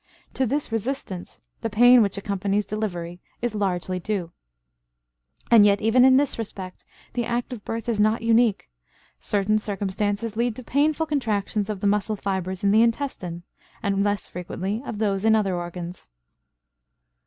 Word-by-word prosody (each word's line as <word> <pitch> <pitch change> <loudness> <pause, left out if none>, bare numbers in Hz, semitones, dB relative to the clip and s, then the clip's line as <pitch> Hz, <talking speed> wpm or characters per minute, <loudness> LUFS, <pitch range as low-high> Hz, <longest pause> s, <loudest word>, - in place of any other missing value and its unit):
To 265 - 0
this 285 +1 -2
resistance 225 -5 -4 0.2
the 225 - -2
pain 245 +3 +7
which 200 -2 0
accompanies 200 +1 -1
delivery 175 -5 -4 0.2
is 240 -2 -2
largely 185 -3 -1
due. 180 -3 -3 1.2
And 225 -3 +8
yet 200 -1 +4
even 225 +3 +4
in 260 0 +7
this 280 -4 +1
respect 190 -4 -7 0.3
the 240 - -1
act 240 +2 -2
of 220 -4 -8
birth 225 +1 -4
is 230 -3 0
not 215 +2 +2
unique; 230 -2 +3 0.5
certain 205 - +1
circumstances 205 +1 -2
lead 235 0 0
to 255 - -8
painful 300 +5 +1
contractions 215 -8 -1
of 205 -3 -4
the - - -2
muscle 210 +1 +1
fibers 190 -2 -3
in 200 - +4
the 220 +2 +5
intestine 230 -8 -1 0.4
and 200 0 +1
less 205 0 -1
frequently 190 +4 -4
of 220 - -4
those 200 -2 0
in 220 0 +5
other 195 -4 +1
organs. 175 0 -6
210 Hz, 155 wpm, -24 LUFS, 195-230 Hz, 1.2 s, And